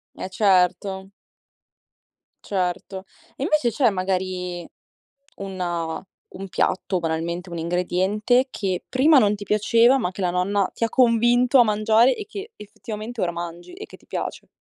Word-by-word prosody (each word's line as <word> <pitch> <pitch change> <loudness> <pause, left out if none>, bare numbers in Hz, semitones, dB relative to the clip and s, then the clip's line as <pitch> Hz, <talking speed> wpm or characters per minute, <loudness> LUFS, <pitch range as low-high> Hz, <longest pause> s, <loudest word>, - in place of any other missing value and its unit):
Eh 190 - -6
certo. 190 0 +1 1.4
Certo. 190 0 -3 0.3
Invece 290 -4 +1
c'è 245 +1 +3
magari 185 -2 -3 0.7
una 175 -3 -4 0.3
un 195 +1 -7
piatto, 185 0 -1
banalmente 170 +2 -3
un 170 - -5
ingrediente, 190 +8 +1
che 185 -3 -3
prima 280 +3 +5
non 210 -3 +3
ti 205 - -9
piaceva, 230 +5 +3
ma 180 -6 -2
che 195 - -8
la 180 -1 +1
nonna 190 +2 0
ti 230 - -2
ha - - +1
convinto 245 +2 +3
a 240 - +7
mangiare 220 +4 +3
e 425 - -7
che 415 +1 -9
effettivamente 215 +2 -8
ora 175 -1 0
mangi 170 - -7
e 405 +4 -9
che - - -14
ti - - -27
piace? - - -5
195 Hz, 145 wpm, -23 LUFS, 180-235 Hz, 1.4 s, a